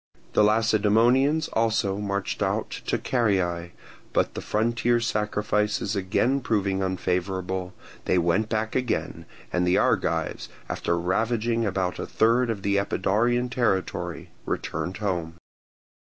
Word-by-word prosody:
The - - +5
Lacedaemonians 115 +7 +3
also 110 -3 +1
marched 100 -1 -2
out - - -1 0.2
to - - +1
Caryae; 95 -8 0 0.4
but - - +1
the - - -5
frontier 120 +2 +1
sacrifices 105 -2 0
again 105 +8 +1
proving 100 -5 0
unfavourable, 95 0 -2 0.3
they - - +2
went 90 +6 +1
back 110 0 -1
again, 125 -2 -2 0.3
and 90 0 +1
the 90 - +3
Argives, - - 0 0.2
after 85 - -1
ravaging 115 +5 0
about 95 -2 -1
a - - -4
third 120 +2 +2
of 105 -4 -3
the 100 0 +2
Epidaurian 115 +5 +1
territory, 110 -8 -1
returned 90 - -3
home. 85 -6 -2
105 Hz, 120 wpm, -25 LUFS, 95-115 Hz, 0.4 s, The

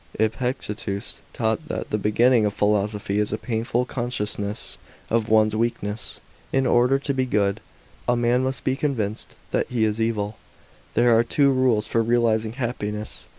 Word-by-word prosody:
Epictetus 110 -3 -2
taught 115 +7 -1
that - - -4
the 105 - +2
beginning 115 +3 +4
of 105 - +2
philosophy 105 0 +1
is 105 - 0
a 110 - -1
painful 120 +1 -1
consciousness 105 -4 -2 0.3
of 115 -1 +1
one's 110 -1 +4
weakness. 110 -2 -2 0.3
In 135 0 +2
order 125 +2 +4
to 140 0 -2
b^ 130 -1 -1
good, 100 -2 +1 0.5
a 120 - +3
man 120 +1 +2
must 130 0 -2
be 130 - +1
convinced 115 -8 -2 0.2
that - - +1
he 115 -3 +1
is 110 +1 -1
evil. 110 -2 -1 0.6
There 120 0 +5
are 115 - +5
two 140 +4 +3
rules 125 -5 +2
for 115 +1 +1
realizing 115 -1 +1
happiness. 110 -4 -4
115 Hz, 155 wpm, -24 LUFS, 105-125 Hz, 0.6 s, There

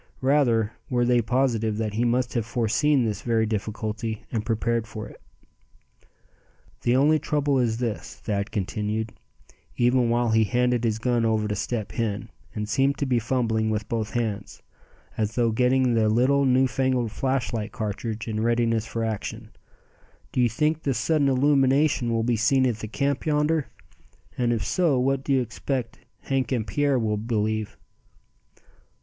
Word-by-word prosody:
Rather 125 -6 +2 0.2
were 120 -1 +1
they 120 0 +3
positive 115 -3 0
that 110 -2 -2
he 115 +3 0
must 120 +1 +1
have 115 - 0
foreseen 120 +4 +1
this 105 -3 -2
very 115 -2 +1
difficulty, 110 +1 -3
and 110 -2 -1
prepared 115 0 0
for 110 -1 -7
it. - - -15 1.6
"The 120 - +2
only 150 +4 +4
trouble 145 -2 0
is 115 -3 +1
this," 115 -8 -4
Thad 100 -1 -3
continued, 105 +1 -3 0.6
even 120 0 +3
while 120 0 +1
he 110 0 +4
handed 125 +1 +1
his 110 -1 +1
gun 120 0 0
over 110 -1 +1
to 105 - -1
Step 105 +1 -3
Hen, 110 -4 -3 0.2
and 105 0 -3
seemed 135 +6 +1
to 140 - -1
be 125 -3 +2
fumbling 115 -2 0
with 105 -1 -2
both 110 -2 -3
hands, 110 -4 -3 0.5
as 110 0 -1
though 120 -2 +2
getting 125 +2 +2
the 110 -2 +3
little 130 +5 +3
new 130 0 +4
fangled 130 -2 0
flashlight 120 -3 -2
cartridge 110 +1 -4
in 110 -1 -2
readiness 115 -1 +1
for 115 - -3
action; 110 -2 -4 0.8
"do 125 - +1
you 120 - +4
think 150 +7 0
the 135 -4 -1
sudden 150 -2 +2
illumination 135 -1 +3
will 115 -1 +1
be 120 0 +1
seen 130 +4 +3
at 120 -4 0
the 110 - -6
camp 140 +5 -1
yonder; 150 0 +1 0.7
and 120 -1 +1
if 110 -4 -1
so 170 -7 +2
what 135 +1 +1
do 140 - -3
you 135 -1 +4
expect 120 +1 -4 0.2
Hank 135 -1 -1
and 120 -5 0
Pierre 145 +2 +1
will 110 -3 0
believe?" 110 -1 -2
120 Hz, 165 wpm, -25 LUFS, 110-130 Hz, 1.6 s, only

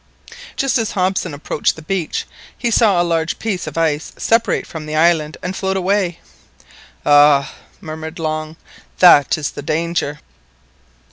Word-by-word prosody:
Just 275 -2 +1
as 225 - -2
Hobson 185 -2 0
approached 150 +1 -1
the 160 - -12
beach, 185 -1 -2 0.3
he 240 - -1
saw 210 -5 +4
a - - +3
large 165 -1 -1
piece 200 -6 -3
of - - -7
ice 160 -2 -1
separate 230 0 +1
from 155 -2 -8
the 155 - -4
island 155 -1 +2
and 180 +1 -3
float 190 0 -1
away! 190 -2 0 0.9
"Ah!" 145 -1 +5 0.3
murmured 160 -1 -7
Long, 155 -1 -3 0.4
"that 155 -7 +6
is 150 -3 -3
the - - -7
danger!" 155 -1 -2
165 Hz, 145 wpm, -18 LUFS, 155-190 Hz, 0.9 s, that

